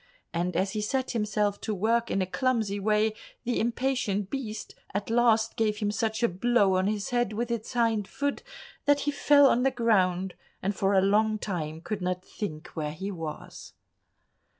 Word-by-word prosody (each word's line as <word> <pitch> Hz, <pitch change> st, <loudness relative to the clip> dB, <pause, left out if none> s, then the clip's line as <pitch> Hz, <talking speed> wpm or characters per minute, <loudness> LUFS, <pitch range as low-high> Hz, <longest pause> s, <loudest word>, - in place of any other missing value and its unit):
And 175 Hz, +1 st, -1 dB
as 190 Hz, +2 st, +1 dB
he 215 Hz, -, -2 dB
set 260 Hz, +5 st, -1 dB
himself 210 Hz, -2 st, 0 dB
to 215 Hz, -, -2 dB
work 230 Hz, +4 st, +1 dB
in 195 Hz, -, +1 dB
a -, -, -1 dB
clumsy 220 Hz, -1 st, 0 dB
way, 215 Hz, +1 st, +2 dB, 0.3 s
the 245 Hz, 0 st, 0 dB
impatient 235 Hz, -4 st, 0 dB
beast 225 Hz, -6 st, -5 dB, 0.2 s
at 200 Hz, +2 st, -2 dB
last 230 Hz, -2 st, +3 dB
gave 215 Hz, -2 st, +1 dB
him 205 Hz, -1 st, 0 dB
such 220 Hz, +1 st, -1 dB
a -, -, +6 dB
blow 200 Hz, +1 st, +2 dB
on 185 Hz, +1 st, +2 dB
his 210 Hz, +1 st, -2 dB
head 240 Hz, -3 st, +1 dB
with 235 Hz, +2 st, -2 dB
its 230 Hz, -2 st, -3 dB
hind 225 Hz, -4 st, +1 dB
foot, 285 Hz, 0 st, -2 dB, 0.4 s
that 285 Hz, 0 st, +4 dB
he 290 Hz, -, 0 dB
fell 285 Hz, 0 st, +5 dB
on 250 Hz, -2 st, +4 dB
the 270 Hz, -, +4 dB
ground, 190 Hz, -7 st, +1 dB, 0.3 s
and 195 Hz, +2 st, -1 dB
for 195 Hz, +1 st, +1 dB
a 190 Hz, -, +6 dB
long 215 Hz, +2 st, +3 dB
time 160 Hz, -6 st, -4 dB
could 205 Hz, +3 st, -4 dB
not 180 Hz, 0 st, -2 dB
think 155 Hz, -7 st, -6 dB
where 150 Hz, -2 st, -4 dB
he 195 Hz, +6 st, -5 dB
was. 165 Hz, -4 st, -7 dB
215 Hz, 185 wpm, -28 LUFS, 190-235 Hz, 0.4 s, a